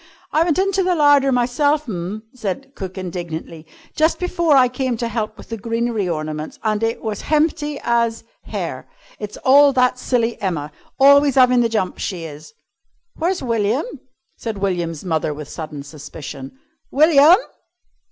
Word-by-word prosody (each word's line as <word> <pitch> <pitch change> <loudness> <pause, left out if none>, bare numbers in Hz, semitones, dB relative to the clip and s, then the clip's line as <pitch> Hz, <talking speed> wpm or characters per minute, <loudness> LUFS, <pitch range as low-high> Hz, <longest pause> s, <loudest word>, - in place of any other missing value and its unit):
"I 310 - +2
went 335 -3 0
into 390 0 +1
the 365 -1 +1
larder 290 -3 +4
myself 285 +4 +1
'm," 195 +1 -5
said 255 +4 -5
cook 190 -6 -7
indignantly, 170 -3 -6 0.3
"just 315 +2 +2
before 345 -4 +1
I 255 -2 +6
came 255 0 -2
in - - -3
to 235 - -2
'elp 215 0 -3
with - - -13
the 225 - -4
greenery 230 -2 -1
ornaments, 155 -1 -4
and 215 -1 0
it 225 0 -1
was 215 -3 -3
hempty 300 -1 0
as 235 -1 0 0.2
hair. - - -5 0.3
It's 210 -1 -6
all 280 +2 +7
that 250 -1 +2
silly 235 -2 -1
Emma! 160 -7 -2 0.3
Always 280 0 +6
'avin' 250 -1 +5
the 230 - +1
jumps, 215 -5 -2
she 180 -4 -4
is 150 -1 -10 0.3
" 345 - -50
"Where's 350 0 0
William?" 230 +2 0 0.5
said 225 -3 -5
William's 175 -4 -2
mother 160 -3 -1
with 150 -1 -8
sudden 150 -2 -7
suspicion. 145 - -9 0.3
"William!" 305 +3 +6
230 Hz, 160 wpm, -20 LUFS, 180-280 Hz, 0.5 s, all